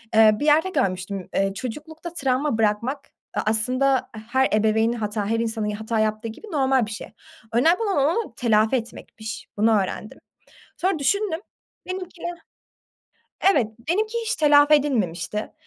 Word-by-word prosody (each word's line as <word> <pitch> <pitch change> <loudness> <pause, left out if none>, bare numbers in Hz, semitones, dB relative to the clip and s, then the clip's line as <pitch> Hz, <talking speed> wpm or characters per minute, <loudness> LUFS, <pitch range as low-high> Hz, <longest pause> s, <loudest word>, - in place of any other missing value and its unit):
Eee, 220 -1 +8
bir 295 - -1
yerde 310 +5 +4
görmüştüm, 195 - -2
eee, 195 0 +1
çocuklukta 310 - -7
travma 270 -4 0
bırakmak 225 +6 0 0.2
a - - 0
aslında 255 +5 +1 0.2
her 265 0 +3
ebeveyni 220 +2 +2
hata, 210 -1 -2
her 230 0 +1
insanın 225 -1 -2
ya 210 0 -3
hata 220 0 -1
yaptığı 215 +1 0
gibi 225 - -11
normal 265 -5 +2
bir - - -7
şey. 210 - -7 0.4
Önemli 325 +10 +4
olan 405 -4 0
onu 325 +11 +1
telafi 220 0 +2
etmekmiş. 225 -2 -6
Bunu 215 0 +4
öğrendim. 210 +3 -7 0.6
Sonra 370 -1 0
düşündüm, 340 +4 0 0.5
benimki 365 -2 -6 1.3
evet, 250 - +2 0.2
benimki 435 +6 0
hiç - - 0
telafi 295 -1 +5
edilmemişti. 210 - 0
250 Hz, 140 wpm, -23 LUFS, 215-300 Hz, 1.3 s, Eee